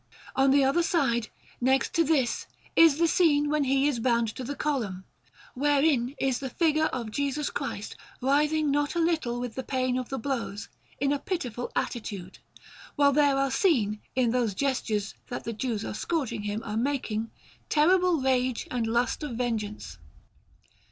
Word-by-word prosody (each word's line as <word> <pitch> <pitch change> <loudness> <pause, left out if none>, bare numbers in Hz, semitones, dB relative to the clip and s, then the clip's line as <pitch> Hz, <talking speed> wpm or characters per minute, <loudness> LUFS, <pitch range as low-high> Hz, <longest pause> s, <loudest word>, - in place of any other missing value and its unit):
On 270 0 +4
the 275 +1 +5
other 275 +6 +3
side, 270 - +1 0.3
next 265 +2 +2
to 330 - +3
this, 280 -6 +1 0.3
is 325 -3 +6
the 335 +1 +3
scene 295 -4 +3
when 300 -2 +2
He 270 +1 +2
is 275 -5 0
bound 235 -1 +2
to 255 - -7
the 285 +4 -4
Column, 215 -13 -2 0.5
wherein 280 -2 +2
is 265 -2 0
the 270 - -4
figure 310 +2 +2
of 235 -4 -4
Jesus 285 +3 -1
Christ - - -4 0.2
writhing 295 +3 +2
not 290 +3 0
a - - +1
little 315 -8 0
with 245 -2 -4
the 260 - -4
pain 255 -1 -1
of 250 - -6
the 270 - -3
blows, 230 -4 -4 0.3
in 275 +1 +1
a 285 - -1
pitiful 250 - -4
attitude, 200 -6 -4 0.6
while 285 -1 +4
there 285 -1 +4
are 275 -1 +1
seen, 235 - +2
in 250 -3 +2
those 235 -5 0
gestures 220 -6 -1
that 245 - -5
the 230 - -4
Jews 225 -1 -2
who - - -4
are - - -4
scourging 280 -2 -2
Him 210 +2 -3
are 210 0 -3
making, 230 -4 -1 0.4
terrible 355 +2 +4
rage 255 -2 0
and 235 -3 -1
lust 235 +4 0
of 290 -6 -4
vengeance. 215 - -3
265 Hz, 170 wpm, -27 LUFS, 235-290 Hz, 0.6 s, is